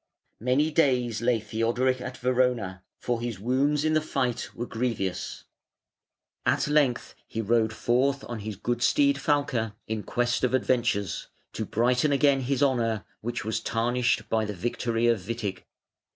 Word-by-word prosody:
Many 130 +7 +2
days 125 -7 +2
lay 120 -1 +2
Theodoric 120 +4 0
at 125 0 -6
Verona, 125 -7 0 0.2
for 120 -1 -2
his 120 -5 -4
wounds 140 +7 +1
in 155 - +2
the 155 - +3
fight 130 -5 -1
were 120 - -3
grevious. 115 -7 -3 1.0
At - - +2
length 145 -5 +2
he 115 - -5
rode 115 0 +2
forth 130 +5 +1
on 120 -2 -6
his 105 0 -5
good 120 +5 -2
steed 280 - +3
Falke, 135 - 0
in 110 -1 -3
quest 120 +3 -1
of 125 0 +3
adventures, 120 -6 0 0.3
to 110 - -3
brighten 125 +7 +2
again 140 0 +4
his 135 +2 0
honour 115 -7 +1
which 120 -1 -4
was 110 +1 -1
tarnished 115 0 0
by 110 0 +1
the 105 -1 -4
victory 115 +4 -1
of 115 -2 +3
Witig. 100 -1 -4
120 Hz, 150 wpm, -27 LUFS, 110-130 Hz, 1.0 s, again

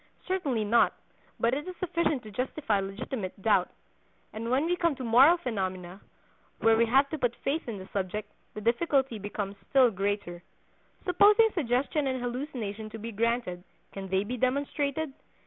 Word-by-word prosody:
Certainly 300 - 0
not; 225 +3 +4 0.5
but 230 +1 +2
it 290 +5 -3
is 365 - -6
sufficient 335 -6 0
to 215 - -10
justify 250 -1 -1
legitimate 195 +1 -5
doubt. 195 -3 +3 0.6
And 230 +2 -4
when 265 +5 +2
we 350 +1 +1
come 335 -4 +1
to 260 - -7
moral 260 +9 +6
phenomena, 190 - -4 0.6
where 225 0 +4
we 230 +1 +3
have 270 +4 +4
to 315 - -3
put 245 -2 0
faith 290 +2 -1
in 220 - -4
the 190 0 -9
subject, 200 +2 -3 0.2
the 215 - -5
difficulty 245 +1 +1
becomes 200 0 -5
still 260 -3 +5
greater. 195 -3 -2 0.6
Supposing 415 +5 +6
suggestion 280 -1 0
and 260 -1 -1
hallucination 240 -4 -4
to 225 - -8
be 225 +2 -6
granted, 225 -5 -1 0.3
can 195 -1 -6
they 190 +1 +1
be 245 +5 -4
demonstrated? 280 +3 -1
235 Hz, 165 wpm, -28 LUFS, 205-280 Hz, 0.6 s, moral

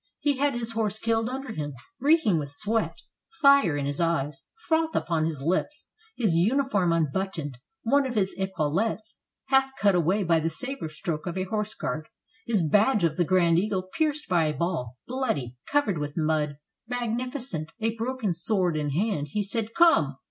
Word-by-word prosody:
He 285 -2 +1
had 280 -1 +1
his 235 -1 -1
horse 220 -2 -1
killed 225 +1 0
under 265 -1 -5
him. 145 -6 -4 0.2
Reeking 275 - +3
with 145 -2 -4
sweat, 215 +9 -1 0.4
fire 280 - +5
in 140 - -2
his 140 0 -2
eyes, 150 -4 0 0.2
froth 320 0 +1
upon 160 -2 +1
his 150 -4 -4
lips, 185 - -1 0.3
his 215 -8 +2
uniform 205 0 +2
unbuttoned, 160 -3 -1 0.2
one 275 +4 +3
of 245 - -5
his 195 -3 +1
epaulets 190 +4 -1 0.3
half 270 0 +4
cut 205 -7 +4
away 180 +4 +2
by 165 -2 +3
the 160 +1 0
saber 265 +3 -4
stroke 155 +1 -4
of 175 +1 -3
a 185 - 0
horse 215 +2 -3
guard, 155 0 -4 0.4
his 215 -7 +2
badge 210 - +3
of 165 -2 +2
the 175 - +2
Grand 170 -1 +4
Eagle 185 -2 -2
pierced 305 -2 0
by 170 -3 +3
a 150 -1 -1
ball, 160 -9 -2
bloody, 220 - -2 0.2
covered 230 - +2
with 145 +1 -5
mud, 155 -2 0 0.3
magnificent, 245 - -3
a 225 0 0
broken 230 -4 -2
sword 180 -1 0
in 150 -1 -1
his 145 +4 -1
hand, 195 -9 0
he 210 +7 -1
said: 220 +2 -2
"Come! 245 - +5
195 Hz, 175 wpm, -26 LUFS, 160-240 Hz, 0.4 s, fire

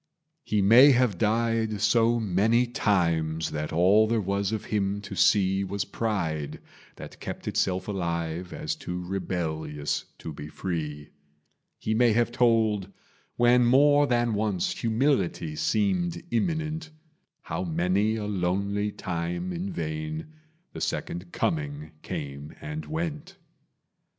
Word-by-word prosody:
He 105 -2 +1
may 125 +8 +8
have 120 -7 +2
died 110 -1 +1
so 115 +3 +3
many 110 +4 +2
times 85 - 0
That 75 0 -3
all 95 +6 +5
there 115 0 +1
was 100 0 -1
of 110 -2 -3
him 100 -1 0
to 100 0 -7
see 95 +1 +3
Was 100 +1 -2
pride, 85 -10 -2 0.4
that - - -10
kept - - -7
itself 95 -1 0
alive 85 -2 -3
As 155 +1 -3
too 90 - -5
rebellious 80 -5 -3
to 80 - -7
be 75 +1 -8
free; 75 -3 -4 0.7
He 110 - -2
may 120 0 +4
have 120 +1 +2
told, 110 -5 +2 0.4
when 120 +1 +5
more 145 +3 +5
than 120 -2 +1
once 105 -3 0
Humility 115 - 0
seemed 90 -3 0
imminent, 160 +6 -1 0.5
How 80 +3 -4
many 90 +6 +1
a 110 -2 -3
lonely 100 +2 -1
time 85 0 -3
in 90 +3 -4
vain 80 - -4 0.4
The - - -7
Second 85 0 -3
Coming 150 -3 -2
came 70 +1 -6
and 155 +1 -6
went. 160 +3 -4
100 Hz, 125 wpm, -27 LUFS, 85-115 Hz, 0.7 s, may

